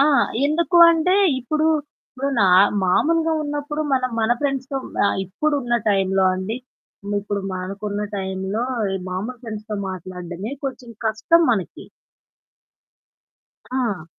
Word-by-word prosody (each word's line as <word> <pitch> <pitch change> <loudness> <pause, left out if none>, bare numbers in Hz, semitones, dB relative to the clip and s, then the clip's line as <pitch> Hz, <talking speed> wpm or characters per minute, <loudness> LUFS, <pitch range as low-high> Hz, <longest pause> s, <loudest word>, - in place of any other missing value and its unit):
ఆ! - - +6 0.4
ఎందుకు 335 +4 +1
అంటే 335 +3 +2 0.2
ఇప్పుడు, 305 +5 0 0.4
ఇప్పుడు 270 +2 -3
నా 195 - +5 0.4
మామూలుగా 325 - +2
ఉన్నప్పుడు 295 +1 -3
మనం 255 -1 0
మన 220 +1 +1
ఫ్రెండ్స్‌తో 275 -1 -2 0.3
ఆహ్, - - 0
ఇప్పుడున్న 245 +5 0
టైమ్‌లో 195 -1 +2
అండి. 190 +5 -3 0.6
ఇప్పుడు 205 0 -3
మనకున్న 200 +3 -4 0.2
టైమ్‌లో 190 +3 -3 0.5
మామూలు 215 +7 -4
ఫ్రెండ్స్‌తో 215 -2 -6
మాట్లాడడమే 185 +3 -6
కొంచెం 255 -3 -5 0.2
కష్టం 225 +11 +3
మనకి. 195 -6 -2 1.9
ఆ! 235 -10 -1
225 Hz, 105 wpm, -22 LUFS, 190-285 Hz, 1.9 s, ఆ